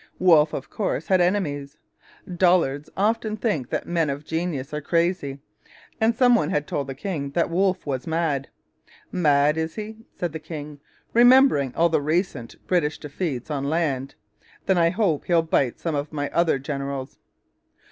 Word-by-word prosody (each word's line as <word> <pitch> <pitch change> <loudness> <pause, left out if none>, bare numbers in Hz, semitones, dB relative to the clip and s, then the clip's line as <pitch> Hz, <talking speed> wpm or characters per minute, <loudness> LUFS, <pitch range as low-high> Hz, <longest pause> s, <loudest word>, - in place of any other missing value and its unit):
Wolfe, 160 -4 +5
of 135 - -4
course, 210 - -2
had 185 -2 +4
enemies. 150 -6 -1 0.5
Dullards 175 -6 +2
often 215 +1 0
think 160 - -1
that - - -2
men 165 -3 0
of 140 +2 -4
genius 160 -5 -3
are 150 - -3
crazy, 165 -3 0 0.6
and 225 +1 +2
some 245 0 +5
one 185 -11 +2
had 150 0 0
told 140 -2 -3
the 135 - -6
king 145 -3 -4
that 170 +1 0
Wolfe 185 +1 +1
was 130 -3 -3
mad. 160 -4 -1 0.6
'Mad, 150 -3 +3
is 160 0 -2
he?' 215 0 -7 0.2
said 175 -3 -3
the 160 - -4
king, 150 -2 -8 0.3
remembering 245 - +5
all 170 +1 +3
the 160 -2 +1
recent 155 - -2
British 165 -5 0
defeats 150 -3 -4
on 140 -1 -2
land 145 -5 -1 0.5
'then 190 -2 +2
I 165 0 +4
hope 185 -6 0
he'll 170 -2 +3
bite 140 -6 0
some 165 - -2
of 145 0 -3
my 145 -2 -3
other 170 -4 +2
generals!' 140 -1 -5
160 Hz, 165 wpm, -24 LUFS, 140-180 Hz, 0.6 s, Wolfe